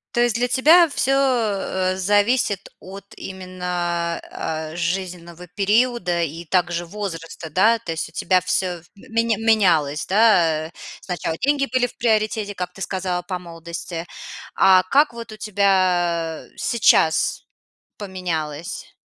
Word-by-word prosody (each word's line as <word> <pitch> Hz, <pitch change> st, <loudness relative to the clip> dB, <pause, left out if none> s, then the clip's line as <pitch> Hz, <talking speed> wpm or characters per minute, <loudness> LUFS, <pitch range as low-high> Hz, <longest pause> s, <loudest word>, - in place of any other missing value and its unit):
То 240 Hz, -, +3 dB
есть 240 Hz, -2 st, +2 dB
для 245 Hz, +1 st, +1 dB
тебя 315 Hz, +8 st, +6 dB
всё, 270 Hz, -2 st, -1 dB
э, 210 Hz, -8 st, 0 dB
зависит 205 Hz, +1 st, +1 dB
от 195 Hz, +1 st, -10 dB
именно, 180 Hz, -2 st, -3 dB
а, 155 Hz, 0 st, -4 dB
жизненного 175 Hz, 0 st, -4 dB
периода 200 Hz, -2 st, +1 dB
и 165 Hz, +2 st, -5 dB
также 175 Hz, 0 st, 0 dB
возраста, 165 Hz, -4 st, -6 dB
да? 215 Hz, +8 st, +3 dB
То 210 Hz, -, -6 dB
есть 165 Hz, -, -3 dB
у -, -, -16 dB
тебя 185 Hz, +1 st, +2 dB
всё 180 Hz, -1 st, -1 dB
в 175 Hz, -, -25 dB
меня 230 Hz, +2 st, -1 dB
менялось, 180 Hz, -10 st, +2 dB
да, 175 Hz, -7 st, +3 dB
э? -, -, -17 dB, 0.3 s
Сначала 175 Hz, -3 st, -3 dB
деньги 280 Hz, 0 st, +1 dB
были 245 Hz, -1 st, +3 dB
в -, -, -17 dB
приоритете, 215 Hz, -2 st, 0 dB
как 180 Hz, -1 st, -4 dB
ты 195 Hz, -, -13 dB
сказала, 185 Hz, -2 st, -2 dB
по 180 Hz, 0 st, -4 dB
молодости. 170 Hz, 0 st, -7 dB, 0.5 s
А 185 Hz, -1 st, +6 dB
как 285 Hz, +10 st, +3 dB
вот 230 Hz, -2 st, -8 dB
у -, -, -11 dB
тебя, 180 Hz, -5 st, +1 dB
э, -, -, -24 dB
сейчас 165 Hz, -8 st, +2 dB, 0.5 s
поменялось? 170 Hz, -6 st, -5 dB
185 Hz, 140 wpm, -22 LUFS, 170-215 Hz, 0.5 s, тебя